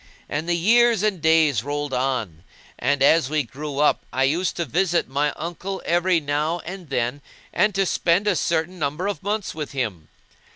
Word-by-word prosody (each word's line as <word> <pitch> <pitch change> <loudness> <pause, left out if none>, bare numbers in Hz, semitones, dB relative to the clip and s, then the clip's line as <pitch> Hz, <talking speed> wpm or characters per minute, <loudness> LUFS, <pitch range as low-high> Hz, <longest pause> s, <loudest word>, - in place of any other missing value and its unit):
And 155 +4 -3
years 220 +5 +4
and 205 -6 0
days 155 -7 +3
rolled 145 0 -3
on; 125 -10 -2 0.4
and, 145 -1 +1
as 145 -1 +4
we 155 -1 +1
grew 140 +3 -7
up, 150 +1 +2
I 130 - +1
used 165 +7 +1
to 170 - -2
visit 175 +4 +1
my 145 +2 0
uncle 175 +4 -5
every 175 0 +2
now 150 +3 -1
and 180 -2 -8
then 125 +1 -1 0.3
and 210 -2 +2
to 195 0 +2
spend 175 +2 +1
a 205 - +3
certain 170 +2 -1
number 150 +5 -2
of 205 0 -3
months 205 +1 -2
with 150 -2 -6
him. 105 - -3
160 Hz, 175 wpm, -23 LUFS, 140-180 Hz, 0.4 s, years